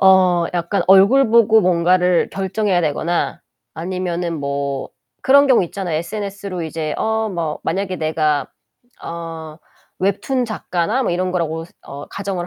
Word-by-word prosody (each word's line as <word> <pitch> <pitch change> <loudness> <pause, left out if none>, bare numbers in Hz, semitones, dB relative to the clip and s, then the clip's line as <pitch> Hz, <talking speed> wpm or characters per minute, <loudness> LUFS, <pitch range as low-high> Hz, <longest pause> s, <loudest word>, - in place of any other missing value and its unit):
어 185 -2 +5
약간 175 +3 0
얼굴 200 +7 +6
보고 225 -1 +5
뭔가를 180 -1 +2
결정해야 195 -1 0
되거나 165 +2 -1 0.3
아니면은 175 -1 -3
뭐 140 -1 -3 0.3
그런 280 +2 +6
경우 255 -8 +4
있잖아요. 175 -2 -4
SNS로 200 0 -5
이제 160 -1 -3
어 220 0 0
뭐 170 -6 -3
만약에 190 +1 -2
내가 155 -3 0 0.6
어 165 -2 -7 0.4
웹툰 200 +7 0
작가나 215 +1 -1
뭐 - - 0
이런 185 +1 -1
거라고서 165 -1 -3
어 140 +1 -9
가정을 190 -3 -4
180 Hz, 290 characters per minute, -19 LUFS, 165-200 Hz, 0.6 s, 얼굴